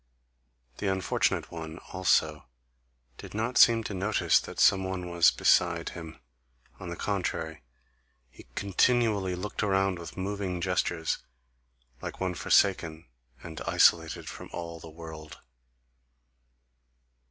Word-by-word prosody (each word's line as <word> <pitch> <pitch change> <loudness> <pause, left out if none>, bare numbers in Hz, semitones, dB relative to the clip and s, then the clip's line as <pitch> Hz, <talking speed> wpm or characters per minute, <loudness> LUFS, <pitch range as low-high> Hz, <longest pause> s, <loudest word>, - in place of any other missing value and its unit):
The 105 - -2
unfortunate 95 -1 0
one, 80 -1 -7 0.2
also, 80 -5 +1 0.7
did - - -10
not 115 +4 0
seem 115 -1 +6
to 105 - -5
notice 100 +3 +2
that - - -9
some 95 0 +5
one 95 -2 -4
was 85 -1 +6
beside 85 -1 +2
him; 80 -2 -9 0.6
on 95 - -7
the 85 - -5
contrary, 85 -5 -3 0.7
he - - -16
continually 100 -2 +2
looked 95 +3 -4
around 95 -3 +1
with 85 0 -9
moving 95 -1 -3
gestures, 85 -2 -1 0.8
like - - -7
one 95 -1 -1
forsaken 85 -4 +1 0.3
and 80 -2 -8
isolated 80 -1 +3
from - - -8
all 85 -1 -6
the 80 - -11
world. 80 -1 -10
90 Hz, 120 wpm, -28 LUFS, 80-95 Hz, 0.8 s, seem